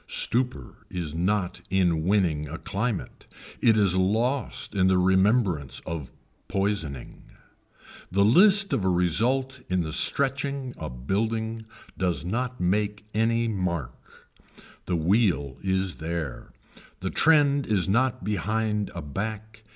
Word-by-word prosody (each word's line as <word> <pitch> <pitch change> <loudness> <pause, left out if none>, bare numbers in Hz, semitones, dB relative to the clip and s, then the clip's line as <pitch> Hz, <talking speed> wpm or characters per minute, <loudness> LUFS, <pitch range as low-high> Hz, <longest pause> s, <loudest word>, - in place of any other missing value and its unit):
Stupor 120 - -2
is 85 -4 -4
not 90 +2 -1
in 90 -4 +2
winning 80 -5 +1
a 80 - -5
climate. 105 +3 -4 0.3
It 110 -2 +5
is 100 -4 +3
lost 115 +9 0
in 95 -2 +3
the 95 0 +3
remembrance 95 - +2
of 80 -5 -5 0.4
poisoning. 95 -10 -3 0.9
The 100 +2 +3
list 195 - +6
of 100 - 0
a 95 - +2
result 115 +10 +1
in 90 -4 0
stretching 140 - +1
a 80 - -6
building 110 - -2 0.3
does 90 -3 -1
not 125 +6 -2
make 105 +3 -1
any 115 +2 +1
mark. 90 - -2 0.9
The 90 - 0
wheel 80 - +1
is 95 -1 -1
there. 80 -5 -5 0.5
The - - -3
trend 145 -3 +3
is 100 -5 +1
not 120 +2 +1
behind 105 +2 -1
a 85 - -5
back. 110 +7 -5
100 Hz, 120 wpm, -26 LUFS, 85-115 Hz, 0.9 s, list